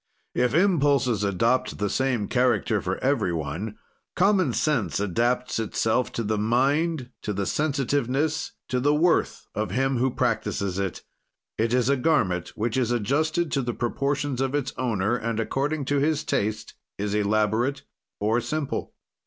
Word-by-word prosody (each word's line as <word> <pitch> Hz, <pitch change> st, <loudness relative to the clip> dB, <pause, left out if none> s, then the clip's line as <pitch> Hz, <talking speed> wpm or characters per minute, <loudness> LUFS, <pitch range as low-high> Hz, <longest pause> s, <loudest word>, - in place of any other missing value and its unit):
If 125 Hz, +1 st, +1 dB
impulses 145 Hz, -, +3 dB
adopt 115 Hz, +6 st, +1 dB
the 105 Hz, -, 0 dB
same 125 Hz, -2 st, 0 dB
character 120 Hz, -4 st, +2 dB
for 95 Hz, +1 st, -2 dB
every 120 Hz, -9 st, +2 dB
one, 85 Hz, +7 st, -4 dB, 0.4 s
common 185 Hz, -6 st, +3 dB
sense 130 Hz, -6 st, 0 dB
adapts 120 Hz, +6 st, 0 dB
itself 115 Hz, +2 st, 0 dB
to 115 Hz, -, -2 dB
the 110 Hz, 0 st, -1 dB
mind, 135 Hz, +5 st, +1 dB
to 105 Hz, -, -3 dB
the 100 Hz, 0 st, -2 dB
sensitiveness, 145 Hz, +2 st, 0 dB, 0.2 s
to 125 Hz, -, 0 dB
the 145 Hz, +3 st, +3 dB
worth 170 Hz, +3 st, +2 dB
of 105 Hz, -1 st, -2 dB
him 135 Hz, +6 st, +1 dB
who 130 Hz, +2 st, +2 dB
practises 100 Hz, -5 st, -1 dB
it; 95 Hz, -2 st, -3 dB, 0.6 s
it 115 Hz, +1 st, +1 dB
is 125 Hz, -1 st, +2 dB
a 140 Hz, 0 st, +3 dB
garment 110 Hz, -, +1 dB
which 115 Hz, +3 st, -1 dB
is 125 Hz, -3 st, +1 dB
adjusted 155 Hz, +8 st, 0 dB
to 140 Hz, -, +1 dB
the 120 Hz, -2 st, -3 dB
proportions 140 Hz, +2 st, -1 dB
of 135 Hz, +1 st, 0 dB
its 135 Hz, -2 st, -1 dB
owner, 115 Hz, -3 st, 0 dB
and, 115 Hz, -2 st, -2 dB
according 140 Hz, +6 st, -1 dB
to 145 Hz, +2 st, +1 dB
his 150 Hz, +1 st, +1 dB
taste, 110 Hz, -4 st, -2 dB, 0.2 s
is 105 Hz, 0 st, -2 dB
elaborate 110 Hz, +6 st, +1 dB, 0.4 s
or 110 Hz, +4 st, +1 dB
simple. 155 Hz, +2 st, -3 dB
125 Hz, 155 wpm, -25 LUFS, 110-140 Hz, 0.6 s, impulses